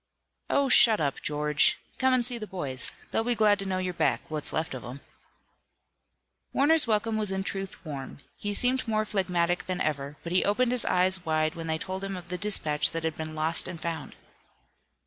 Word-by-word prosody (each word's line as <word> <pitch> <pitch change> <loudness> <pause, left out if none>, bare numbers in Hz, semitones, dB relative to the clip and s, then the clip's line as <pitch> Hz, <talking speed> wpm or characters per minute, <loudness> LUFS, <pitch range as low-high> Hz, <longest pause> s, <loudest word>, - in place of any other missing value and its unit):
"Oh, 280 -1 +2
shut 230 -4 +7
up, 140 -3 -1
George! 150 0 +2 0.2
Come 260 0 +3
and 255 -2 +3
see 245 -1 +2
the 215 - -6
boys. 140 -10 0 0.2
They'll 225 - +1
be 240 +1 0
glad 210 -2 +3
to 195 - -4
know 185 -1 -1
you're 185 -1 -2
back 125 -8 +1
what's 155 -2 -3
left 160 -2 -2
of 130 - -7
'em." 125 +3 -8 1.5
Warner's 300 +1 +4
welcome 220 0 +1
was 210 -2 0
in 190 0 -2
truth 195 -1 -6
warm. 140 -4 -7 0.2
He 205 0 -3
seemed 250 +2 +1
more 215 -1 0
phlegmatic 180 -4 0
than 185 -1 -2
ever, 145 -3 -2
but 170 - -6
he 185 - +3
opened 235 +5 +1
his 250 -3 +3
eyes 185 0 +2
wide 155 -1 0
when 165 -1 -6
they 160 0 0
told 190 +3 -5
him 195 -1 -4
of 175 -1 -10
the 180 - -3
dispatch 160 -8 +2
that 165 0 -4
had 160 -1 -2
been 155 0 -6
lost 160 +2 +1
and 170 - -7
found. 160 -2 -5
185 Hz, 205 wpm, -27 LUFS, 155-215 Hz, 1.5 s, shut